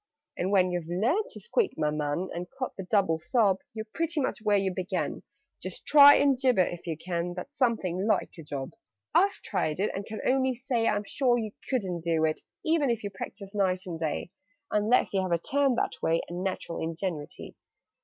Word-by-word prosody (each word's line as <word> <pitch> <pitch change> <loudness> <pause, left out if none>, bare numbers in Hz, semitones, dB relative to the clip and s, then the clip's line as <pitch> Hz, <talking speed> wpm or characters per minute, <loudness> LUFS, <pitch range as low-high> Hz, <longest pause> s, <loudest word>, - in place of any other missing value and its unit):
"And 180 - -1
when 185 -2 +3
you've 175 -2 -3
learned 240 - +1
to - - -9
squeak, 475 -3 0
my 150 - +1
man 150 +4 -2
And 175 +1 -5
caught 255 - -3
the - - -5
double 190 -7 +2
sob, 195 +1 +2 0.2
You're 220 0 -4
pretty 330 -1 -1
much 265 - -1
where 210 -2 +3
you 195 -1 0
began: 180 0 -2 0.4
Just 185 -1 -5
try 285 -1 +9
and 280 -1 +4
gibber 250 -9 +4
if 175 0 -7
you 160 -2 -2
can! 175 +1 -3
That's 190 +11 -8
something 210 -7 0
like 220 - +1
a - - -6
job! 140 -3 -5 0.4
"I've 400 +2 +3
tried 155 +2 -1
it, 205 - +1
and 195 - -4
can 215 +1 -7
only 260 0 +2
say 245 -2 0
I'm 205 0 +1
sure 245 +3 +1
you 220 -3 -3 0.2
couldn't 185 -10 -1
do 165 -2 +2
it, 155 0 -1 0.2
e 325 +1 +3
ven 285 -3 +1
if 230 -2 -1
you 205 - -4
practised 195 +1 -8
night 185 -3 0
and 170 -3 -5
day, 160 +2 -2 0.4
Unless 210 +3 +2
you 195 - +2
have 185 -1 -3
a 170 - +4
turn 275 - +1
that - - -2
way, 165 +1 +1
And 175 +1 -5
natural 185 -3 -3
ingenuity. 165 -2 -4
195 Hz, 205 wpm, -28 LUFS, 175-245 Hz, 0.4 s, try